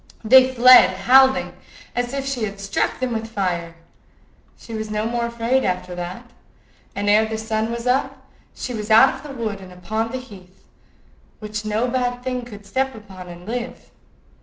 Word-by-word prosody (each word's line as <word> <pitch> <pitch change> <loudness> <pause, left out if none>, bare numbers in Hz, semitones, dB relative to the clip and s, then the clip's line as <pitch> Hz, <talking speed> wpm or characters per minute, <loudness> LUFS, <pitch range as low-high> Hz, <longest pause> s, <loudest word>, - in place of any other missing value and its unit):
They 260 +3 +6
fled 245 -6 +7
howling, 265 +5 +4 0.4
as 245 0 -1
if 275 0 -3
she 270 -4 -3
had 200 -1 -7
struck 200 0 -2
them 255 -2 -2
with 225 0 -3
fire. 175 -5 -3 0.8
She 230 - -11
was 220 -1 -4
no 215 0 -2
more 235 +1 -1
afraid 235 +3 0
after 180 0 -2
that, 180 +8 -7 0.6
and 205 +1 -3
ere 215 +2 +4
the 220 0 -4
sun 220 0 -2
was 235 0 -5
up 255 +2 -1 0.3
she 250 - -5
was 215 -1 -5
out 225 +5 +6
of 265 - -10
the 280 -2 -9
wood 205 -3 -3
and 185 -1 -12
upon 220 +5 -3
the 260 - -4
heath, 195 -7 -14 0.7
which 215 0 -6
no 215 +3 0
bad 245 0 -2
thing 250 -1 -3
could 205 -4 -12
step 265 +4 -2
upon 190 -4 -11
and 175 0 -11
live. 245 +1 -6
225 Hz, 180 wpm, -21 LUFS, 205-250 Hz, 0.8 s, fled